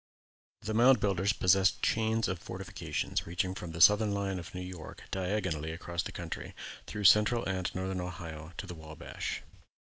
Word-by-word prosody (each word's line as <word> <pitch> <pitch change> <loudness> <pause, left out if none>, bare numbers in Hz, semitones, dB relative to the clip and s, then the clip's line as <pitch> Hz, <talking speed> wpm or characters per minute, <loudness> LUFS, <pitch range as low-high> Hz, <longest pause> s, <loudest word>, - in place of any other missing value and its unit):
The 110 - -2
Mound 125 +4 +6
Builders 100 -2 +2
possessed 95 -2 +3
chains 110 0 +2
of 90 -2 -2
fortifications 95 -1 -3
reaching 90 +2 -1
from 90 -3 -6
the 80 - -6
southern 105 +3 +6
line 100 -2 -1
of 85 +1 -9
New 90 - -4
York 90 -3 -8
diagonally 95 -5 -1
across 85 +1 -3
the - - -6
country, 85 -1 -6 0.3
through 105 - -4
Central 105 +4 +6
and 95 -1 -1
Northern 95 0 -2
Ohio 80 -2 -7
to - - -4
the - - -7
Wabash. 80 0 -6
95 Hz, 160 wpm, -31 LUFS, 85-105 Hz, 0.3 s, Mound